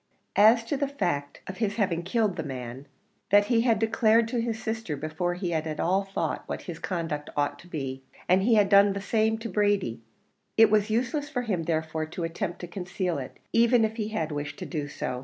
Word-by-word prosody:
As 225 +3 +6
to 255 +5 -2
the 280 0 0
fact 175 - -2
of 190 - -7
his 210 -3 -1
having 185 -6 0
killed 200 +2 0
the - - -3
man, 130 -1 -6 0.4
that 205 +1 +6
he 230 - +4
had 230 -2 +3
declared 225 +1 +3
to 240 -1 0
his 230 -1 -2
sister 220 -9 -3
before 160 +4 -2
he 180 -1 -3
had 160 -1 -1
at 155 -1 -4
all 190 +3 +1
thought 195 - -2
what - - -5
his 170 -2 -7
conduct 165 -5 -3
ought 145 0 0
to 175 - -14
be, 135 -5 -4 0.3
and 185 +2 +4
he 225 +3 +4
had 205 -2 +5
done 200 0 +6
the 200 - -3
same 220 +2 +1
to 225 +1 -6
Brady; 205 - 0 0.6
it 225 -1 +7
was 215 0 +3
useless 255 +6 -1
for 250 -5 -2
him 195 -7 -1
therefore 160 -1 -1
to 170 +2 -5
attempt 165 +1 -3
to 175 - -5
conceal 180 -2 -3
it, 130 - -8 0.2
even 235 0 +5
if 220 +1 -4
he 215 -2 -1
had 165 -8 -2
wished 145 0 -4
to - - -6
do 150 -4 -3
so. 125 -3 -4
195 Hz, 220 wpm, -27 LUFS, 160-220 Hz, 0.6 s, it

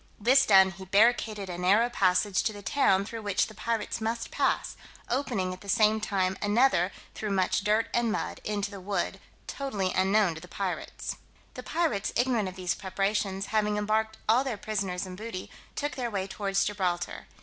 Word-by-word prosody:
This 260 +5 +5
done, 190 -2 +7
he 190 +1 -10
barricaded 210 0 +2
a 175 -1 -5
narrow 200 +6 +4
passage 195 -3 +2
to 215 - -1
the 205 -1 -10
town 195 -2 +2
through 225 +2 -6
which 205 -2 +1
the 215 - -11
pirates 225 +1 -2
must 230 +1 -2
pass, - - 0 0.3
opening 235 -8 -1
at 185 - -11
the 200 - -10
same 215 0 +3
time 190 -3 0
another 205 -3 +3 0.2
through 215 - -4
much 190 -1 +1
dirt 215 +2 +2
and 235 -1 +2
mud - - -3
into 205 -1 -2
the 200 -2 -8
wood 200 +2 -2 0.3
totally 210 -10 -2
unknown 190 -1 +3
to 160 - -9
the 180 - -11
pirates. 190 0 -4 0.4
The - - -7
pirates, 245 -13 -1
ignorant 240 -6 +1
of 185 - -11
these 185 -1 -1
preparations, 195 0 -2
having 210 -1 +2
embarked 220 +1 0
all 235 +4 +4
their 255 -6 -3
prisoners 195 -3 -2
and 185 -1 -8
booty, 210 -2 -7 0.2
took 290 0 -2
their 245 -2 -3
way 195 -3 -2
towards 195 0 -1
Gibraltar. 180 -4 -2
205 Hz, 185 wpm, -28 LUFS, 190-220 Hz, 0.4 s, done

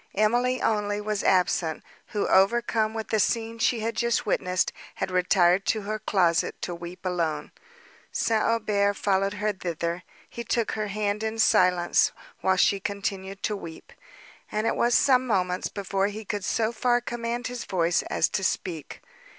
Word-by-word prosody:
Emily 240 +5 +2
only 205 -1 0
was 210 -1 -2
absent; 180 -3 +1 0.2
who, 205 - -2
overcome 220 +2 +2
with 220 -1 -4
the 220 - +1
scene 230 +2 0
she 225 0 +1
had 225 +1 -2
just 235 -1 0
witnessed, 185 -3 0 0.2
had 190 - -3
retired 180 0 +3
to 220 - +1
her 215 +2 -4
closet 175 -6 +1
to 175 - -3
weep 175 +2 -9
alone. 170 -4 -1 0.6
St. 225 -1 +1
Aubert 210 -3 +1
followed 195 0 +1
her 210 +1 0
thither: 170 -1 -3 0.3
he 235 - -7
took 235 0 0
her 215 -1 -2
hand 205 +1 -2
in 220 0 -3
silence, 180 -5 +3 0.3
while 190 0 +2
she 195 +2 +3
continued 195 -1 -4
to 210 - 0
weep; 165 -5 -10 0.6
and 215 +1 -1
it - - +1
was 240 0 +2
some 255 -2 +4
moments 185 -4 0
before 195 -1 -1
he 210 +1 -7
could 205 0 -3
so 220 +3 0
far 240 +1 +2
command 240 0 -4
his 250 -1 -4
voice 175 -2 +1
as - - +2
to 190 - -2
speak. 170 -6 -3
205 Hz, 165 wpm, -26 LUFS, 185-225 Hz, 0.6 s, some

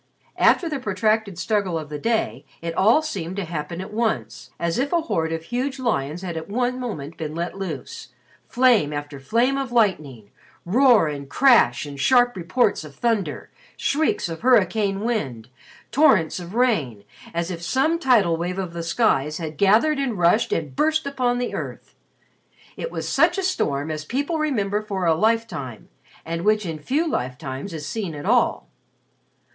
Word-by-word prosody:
After 345 - +4
the 300 -4 -3
protracted 215 -3 0
struggle 185 -1 0
of 155 -2 -6
the 150 -1 -5
day 230 +3 -1 0.2
it 165 0 -4
all 220 - +4
seemed 190 - -4
to 200 -2 -3
happen 165 +1 -5
at 190 +2 -8
once, 225 0 -2
as 170 +5 -1
if 280 +2 0
a 340 - +2
horde 165 - -1
of 165 0 -3
huge 255 +7 -3
lions 175 - -2
had 175 -3 -4
at 160 +4 -6
one 250 +3 -1
moment 165 - -6
been 155 -1 -5
let 170 +1 -3
loose: 170 -9 -6 0.4
flame 235 - +3
after 145 -1 -6
flame 235 - +1
of 270 -3 -4
lightning, 150 - 0 0.3
roar 235 - +5
and 140 -2 -6
crash 235 - +4
and 140 -1 -8
sharp 245 - +4
reports 190 +3 +1
of 150 -2 -12
thunder, 225 - -1 0.3
shrieks 310 - 0
of 165 -1 -6
hurricane 210 -4 +2
wind, 135 - -3 0.4
torrents 215 - +3
of 175 +3 -8
rain, 160 - +1 0.3
as 170 +2 -2
if 170 -2 -6
some 275 - +1
tidal 220 - +3
wave 175 +2 -3
of 185 -3 -4
the 170 - -4
skies 160 - +1
had 160 -2 -5
gathered 220 - +3
and 255 -6 -1
rushed 180 +6 +3
and 150 -5 -2
burst 315 0 +1
upon 255 -3 0
the 245 0 -2
earth. - - -6 0.8
It - - -5
was - - -5
such - - +3
a 385 - -1
storm 150 - -1
as 155 -1 -4
people 285 - -2
remember 210 -9 0
for 195 -4 -3
a 165 - +4
lifetime 170 - -1 0.4
and 165 +1 -3
which 210 0 +2
in 160 -3 -4
few 290 - 0
lifetimes 130 - -4
is 155 -3 -6
seen 195 -3 -4
at 145 - -7
all. - - +2
195 Hz, 175 wpm, -23 LUFS, 160-245 Hz, 0.8 s, roar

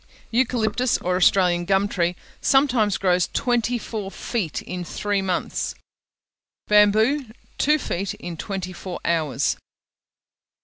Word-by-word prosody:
Eucalyptus, 245 0 +1
or 180 +1 -1
Australian 180 -1 +3
gum 195 +2 +2
tree, 175 -3 0 0.3
sometimes 250 -7 +3
grows 180 -3 +2
twenty 240 -1 +1
four 215 -4 -5
feet 195 - -3
in 180 -1 -5
three 205 +3 -1
months: 185 -2 -2 0.9
bamboo, 215 +7 +4 0.3
two 300 +2 +4
feet 195 - -3
in 175 -1 -7
twenty 185 +1 -5
four 180 0 -7
hours. 155 -4 +1
200 Hz, 115 wpm, -23 LUFS, 180-230 Hz, 0.9 s, bamboo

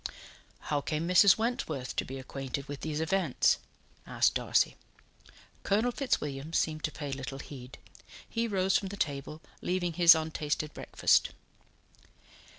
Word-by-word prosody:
"How 145 -1 -1
came 155 +3 -2
Mrs. 185 +2 +6
Wentworth 165 - -2
to - - +2
be 135 - -7
acquainted 135 +1 -5
with 145 -1 -7
these 155 -1 -3
events?" 160 -2 +2 0.5
asked - - +2
Darcy. - - +1 0.9
Colonel 220 +5 +1
Fitzwilliam 150 - -2
seemed 155 -2 0
to 155 - -3
pay 145 -2 -6
little 135 0 -5
heed; 130 -3 -10 0.5
he 230 0 -1
rose 190 -2 +1
from 195 - +1
the 200 +1 -7
table, 150 -1 -3 0.2
leaving 180 -1 -1
his 170 0 +8
untasted 155 -1 -2
breakfast. - - +2
155 Hz, 135 wpm, -30 LUFS, 140-185 Hz, 0.9 s, his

